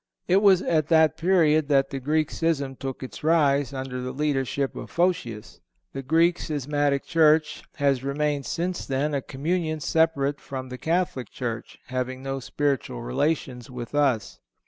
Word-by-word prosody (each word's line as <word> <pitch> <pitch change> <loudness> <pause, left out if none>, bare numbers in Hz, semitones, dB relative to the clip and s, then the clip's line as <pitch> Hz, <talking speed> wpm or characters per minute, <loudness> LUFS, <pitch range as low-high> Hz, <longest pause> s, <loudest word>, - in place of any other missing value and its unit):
It 190 +2 +4
was 195 -3 +5
at 155 -3 +1
that 160 -1 +4
period 160 -4 +3
that 135 -2 +2
the 135 - -3
Greek 155 +3 0
schism 145 -5 -1
took 135 0 -6
its 130 - -9
rise, 145 -4 +3
under 130 -2 -5
the 125 0 -4
leadership 135 -1 -1
of - - -7
Photius. 165 - -1 0.3
The 135 - -4
Greek 165 +5 +3
schismatic 145 -1 -1
church 155 -2 +3
has 140 -3 +1
remained 145 0 -1
since 175 +1 -3
then 140 +3 0
a 140 - 0
communion 155 +4 -2
separate 145 -2 +1
from 130 -1 -6
the 125 0 -7
Catholic 165 - -1
Church, 115 -2 -5
having 130 0 -4
no 135 0 -3
spiritual 130 +1 -2
relations 130 -1 -1
with 125 -1 -7
us. 135 -8 +1
140 Hz, 155 wpm, -25 LUFS, 130-160 Hz, 0.3 s, was